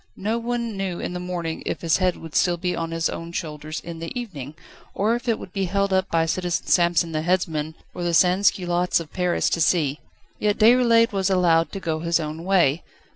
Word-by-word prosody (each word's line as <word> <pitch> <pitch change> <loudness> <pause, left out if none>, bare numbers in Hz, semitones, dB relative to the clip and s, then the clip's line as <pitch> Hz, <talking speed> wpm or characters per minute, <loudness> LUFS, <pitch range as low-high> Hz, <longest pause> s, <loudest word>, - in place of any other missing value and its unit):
No 220 +4 -1
one 235 -2 -3
knew 190 -3 -3
in - - -4
the 180 - -4
morning 175 -3 -4
if - - -3
his 165 -2 +2
head 185 -1 +1
would 165 -2 -10
still 175 -1 +2
be 180 +1 -2
on 165 0 -3
his 165 0 0
own 165 0 -6
shoulders 155 -2 -5
in 165 -1 -8
the 165 - -6
evening, 155 - -7 0.4
or 210 +3 +2
if 240 0 -4
it 225 - +2
would 185 - -10
be 195 -1 -1
held 200 +1 0
up 190 0 +1
by 165 -1 +2
Citizen 175 +1 -1
Samson 170 -1 +2
the 155 -1 -1
headsman, 160 -3 -1 0.2
for - - -6
the 170 -1 +1
sansculottes 180 -1 +3
of 165 -2 -9
Paris 180 -1 0
to 165 - 0
see. 155 -4 +2 0.4
Yet 210 -1 +1
Déroulède 230 0 +5
was 195 -1 0
allowed 170 -3 +3
to 195 - -4
go 165 -4 -2
his 170 +1 +1
own 155 +1 -5
way. 175 -5 +3
175 Hz, 215 wpm, -23 LUFS, 165-195 Hz, 0.4 s, Déroulède